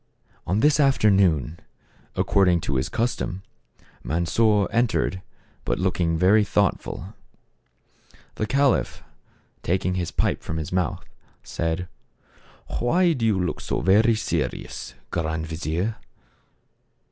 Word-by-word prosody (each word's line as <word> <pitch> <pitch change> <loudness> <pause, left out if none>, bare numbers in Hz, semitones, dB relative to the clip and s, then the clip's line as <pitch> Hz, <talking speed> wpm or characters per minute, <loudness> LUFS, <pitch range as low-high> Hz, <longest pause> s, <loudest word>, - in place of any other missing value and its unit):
On 100 +5 +1
this 150 0 +4
afternoon, 95 - +3 0.6
according 90 -3 +3
to 70 - -1
his 65 +4 -1
custom, 115 -5 -2 0.6
Mansor 100 +6 +2
entered, 115 -5 0 0.4
but - - -1
looking 90 -3 0
very 100 +5 +5
thoughtful. 100 -1 -1 1.2
The 110 - -3
caliph, 140 +2 +1 0.6
taking 90 +1 0
his 90 -2 -2
pipe - - 0
from 80 - -5
his 80 -2 -4
mouth, 90 -3 -1 0.4
said, 80 +2 -3 0.4
" - - -10
Why 170 +8 +3
do 120 -6 0
you 105 -3 +2
look 90 -1 -2
so - - -2
very 110 +5 +4
serious, 80 -10 -3 0.2
Grand 80 -1 -2
vizier 85 +6 -3
95 Hz, 110 wpm, -24 LUFS, 80-110 Hz, 1.2 s, very